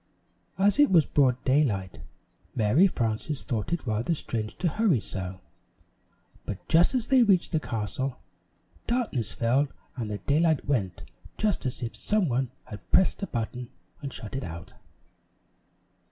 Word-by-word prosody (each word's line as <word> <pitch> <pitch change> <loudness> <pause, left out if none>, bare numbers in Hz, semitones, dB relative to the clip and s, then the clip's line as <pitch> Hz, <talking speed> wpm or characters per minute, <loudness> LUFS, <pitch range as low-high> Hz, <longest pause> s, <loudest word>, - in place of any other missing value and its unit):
As 200 +7 +3
it 290 - +7
was 170 -5 +5
broad 130 -3 +2
daylight, 120 - +1 0.5
Mary 125 - +5
Frances 120 - -2
thought 110 +3 -3
it 170 -3 -1
rather 115 +8 0
strange 110 -6 -4
to 180 - 0
hurry 180 - +2
so, 95 -2 -6 1.0
but 100 - -7
just 170 +9 +4
as 245 -3 +1
they 265 -2 +6
reached 195 -6 +3
the 160 - +2
castle, 120 +2 -3 0.7
darkness 225 - -1
fell 130 +5 +2 0.3
and 115 -4 -4
the 105 - -3
daylight 155 - +2
went 100 - -1 0.3
just 205 -10 0
as 125 - -4
if 115 - -4
some 210 -4 +1
one 130 -1 0
had 105 -5 -11
pressed 190 - +4
a 195 - -2
button 120 +1 -4 0.3
and 140 -2 -5
shut 110 0 -7
it 135 - -3
out. 85 +2 -8
130 Hz, 150 wpm, -27 LUFS, 110-170 Hz, 1.0 s, it